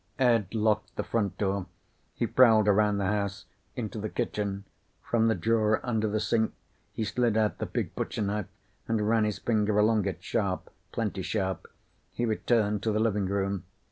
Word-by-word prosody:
Ed 115 -6 +2
locked 110 -1 +1
the - - -2
front 105 -4 -1
door. 95 -2 -1 0.5
He - - 0
prowled 110 -4 +5
around 105 0 +4
the 100 - 0
house, 100 0 -1 0.3
into 110 -2 -4
the 105 +1 -3
kitchen. 100 -2 -2 0.4
From 115 -1 +2
the 110 - +3
drawer 110 +3 +2
under 110 -3 0
the 110 +1 0
sink 110 +1 +1 0.4
he 110 - -3
slid 110 +1 +1
out 110 -1 +1
the - - -2
big - - -3
butcher - - -2
knife 105 -1 -2 0.4
and 110 -2 0
ran 110 -1 +3
his 105 -1 -1
finger 105 -2 +1
along 105 -1 +3
it. - - -4
Sharp. - - -2 0.2
Plenty 105 -4 -2
sharp. 95 -1 -2 0.5
He 120 - -1
returned 110 -2 +1
to 110 - 0
the 105 - +1
living 105 -3 +1
room. 100 -1 -1
105 Hz, 175 wpm, -28 LUFS, 100-110 Hz, 0.5 s, prowled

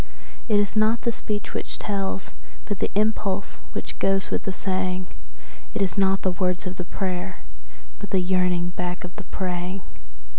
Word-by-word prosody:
So 215 - +4
it - - +7
is 205 +1 +2
not 220 +2 +4
the 235 - +2
speech 210 -2 -3
which - - -3
tells, 195 -1 -1 0.3
but 205 -3 -2
the - - +2
impulse 205 -2 +1
which - - -4
goes 195 0 +3
with - - 0
the 195 - +1
saying; 185 -1 0
And - - -18
it - - +1
is 185 - 0
not 195 -1 +4
the 185 - +4
words 180 +1 +1
of 185 0 -3
the 180 - -2
prayer, 185 0 -2 0.6
but 205 - -5
the 190 - +3
yearning 180 -1 +3
back 180 0 -2
of 180 0 -7
the 205 - -6
praying. 180 +1 -2
190 Hz, 185 wpm, -26 LUFS, 180-200 Hz, 0.6 s, it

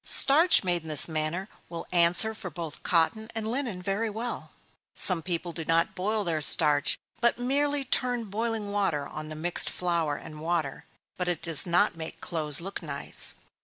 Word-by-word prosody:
Starch 310 +4 +6
made 175 -2 -1
in 160 - -14
this 155 -2 +10
manner 160 +4 -3 0.2
will 170 -1 -8
answer 175 +5 +4
for 195 -4 -8
both 165 -4 -8
cotton 200 +6 -1
and 220 -1 -4
linen 230 -6 -5
very 200 +4 -3
well. 225 +3 -7 0.5
Some 180 -3 +5
people 175 0 -4
do 165 - -6
not 165 +5 0
boil 210 +3 -3
their 165 -4 -3
starch, 145 0 +3 0.2
but 235 0 0
merely 280 +3 -2
turn 245 -2 -2
boiling 220 0 -5
water 190 -8 -2
on 155 0 -8
the 155 - -8
mixed 170 +3 -1
flour 170 -4 -3
and 155 0 -11
water, 160 -3 -4 0.3
but 180 - -4
it 175 -1 -5
does 165 -1 +5
not 175 +3 +1
make 160 -1 -9
clothes 155 -2 +2
look 195 +3 -8
nice. 145 -4 -5
175 Hz, 175 wpm, -26 LUFS, 160-220 Hz, 0.5 s, this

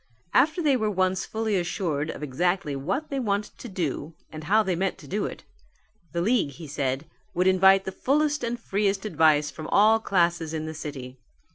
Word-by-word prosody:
After 320 +4 +3
they 285 -3 +4
were 220 -4 0
once 185 -1 0
fully 220 -1 -1
assured 165 -4 -2
of - - -6
exactly 170 +2 0
what 195 - -3
they 275 - -1
wanted 205 -4 -2
to 240 - -8
do 165 -4 -3 0.2
and 155 -1 -8
how 215 +5 +4
they 190 -3 0
meant 190 +2 -1
to - - -13
do 205 +3 -1
it, - - -9 0.7
the 170 - -1
league 210 - +1
he 165 +4 -10
said, 140 -1 -2 0.3
would 180 +1 +2
invite 190 +1 +5
the 190 - -3
fullest 295 +8 +1
and 235 0 -2
freest 200 -2 -1
advice 155 -5 +3
from 155 -1 -8
all 220 +2 +5
classes 170 -5 +1
in 155 0 -3
the 160 - -5
city. 135 -4 -7
185 Hz, 190 wpm, -26 LUFS, 155-215 Hz, 0.7 s, invite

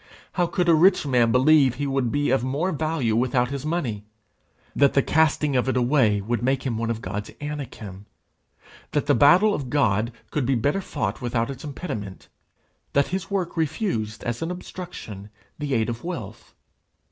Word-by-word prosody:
How 175 -2 +1
could 180 +1 -1
a 170 - +6
rich 180 +2 +4
man 125 -4 +3
believe 135 0 +5
he 145 +2 -3
would 135 -4 0
be 145 -2 +1
of 135 -2 +2
more 145 +8 -1
value 155 -8 0
without 125 +1 +1
his 140 +1 -4
money? 125 -11 -2 0.7
that 140 -1 +4
the 140 - +4
casting 150 -2 +2
of 125 +1 +2
it 130 - +1
away 120 -5 +3
would 115 +2 -2
make 130 +1 0
him 125 -4 -2
one 115 0 -1
of 115 -1 -3
God's 105 +3 -4
Anakim? 120 -10 -7 0.9
that - - +1
the - - +3
battle 180 - +5
of 135 -8 -4
God 115 -5 +1 0.2
could 150 - 0
be 135 - +2
better 145 - 0
fought 120 - -3
without 120 0 -1
its 135 -1 -9
impediment? 110 - -6 0.6
that 140 0 +2
his 190 +1 -3
work 190 -4 -2
refused 140 - -2
as 120 -1 -3
an 165 - -2
obstruction 175 - -8 0.3
the 145 -3 -1
aid 110 -1 +1
of 120 -1 -5
wealth? 125 - -7
135 Hz, 180 wpm, -24 LUFS, 115-155 Hz, 0.9 s, a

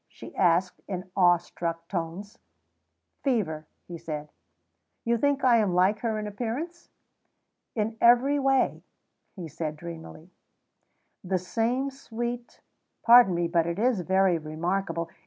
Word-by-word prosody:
she - - -13
asked 180 0 +2
in 185 -1 -6
awe 175 -2 +5
struck 170 0 -5
tones. 180 +3 -5 0.8
"Fever," 165 - -1 0.2
he 170 -2 -8
said. 150 -2 -6 0.8
"You 235 0 +2
think 285 +1 +1
I 245 -2 +5
am 205 -5 +1
like 190 +4 +3
her 225 -2 -1
in 215 - -4
appearance?" 250 - -5 0.9
"In 220 0 -2
every 250 +5 +5
way," 270 -1 +1 0.5
he 180 -5 -7
said 155 0 -5
dreamily; 165 +1 -10 0.9
"the 185 0 0
same 235 +9 -1
sweet 240 -2 -6 0.4
pardon 235 -5 +7
me, 170 0 0
but 170 -1 +1
it 170 +1 -3
is 230 -2 +1
very 190 -1 +2
remarkable. 170 +3 -2
190 Hz, 130 wpm, -27 LUFS, 170-235 Hz, 0.9 s, pardon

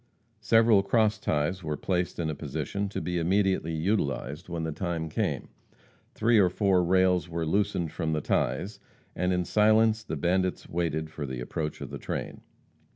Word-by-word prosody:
Several 110 0 +5
cross 110 +2 +2
ties 80 +2 -1
were 75 -1 -3
placed 90 -1 -1
in 85 - -1
a 80 - -1
position 100 +6 -3
to - - -4
be 90 -1 -2
immediately 95 -2 +1
utilized 80 - -1
when 85 -1 -3
the 80 - -2
time 85 -1 -3
came. - - -2 0.7
Three 115 0 +4
or 95 -3 +5
four 95 -1 +2
rails 90 0 +2
were 85 -1 -2
loosened 95 -1 0
from 80 - -2
the 75 - 0
ties, 100 +7 -1 0.4
and 90 0 0
in 90 -1 0
silence 110 +2 +3
the 80 - -4
bandits 90 +4 0
waited 80 -2 -2
for 75 -2 -5
the 65 -1 -5
approach 75 +5 -4
of - - -6
the - - -6
train. - - -5
90 Hz, 170 wpm, -28 LUFS, 80-100 Hz, 0.7 s, Several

